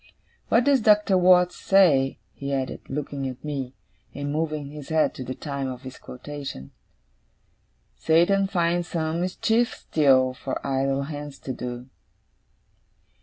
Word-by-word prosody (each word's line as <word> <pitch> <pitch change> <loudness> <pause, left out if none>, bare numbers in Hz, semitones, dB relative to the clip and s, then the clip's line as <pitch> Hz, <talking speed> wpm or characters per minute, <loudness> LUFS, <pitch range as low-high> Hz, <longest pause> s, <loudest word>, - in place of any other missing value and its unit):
What 230 - +4
does 275 -1 +3
Doctor 210 -2 +4
Watts 180 -1 +5
say,' 150 -9 +3 0.2
he 140 0 -5
added, 135 -1 -2
looking 140 -1 -3
at 125 - -10
me, 135 -4 -4 0.4
and 145 0 -3
moving 155 -2 -2
his 150 -2 -9
head 160 -1 +2
to 130 - -7
the 130 +1 -5
time 140 -2 -4
of 130 0 -7
his 130 0 -9
quotation, 135 - -8 1.3
'"Satan 175 +5 +3
finds 175 -2 0
some 160 0 -2
mischief 225 +6 +1
still, 130 -4 +3
for 130 +1 -5
idle 135 0 0
hands 145 -1 -7
to 130 - -4
do." 125 0 -6
145 Hz, 135 wpm, -25 LUFS, 135-175 Hz, 1.3 s, Watts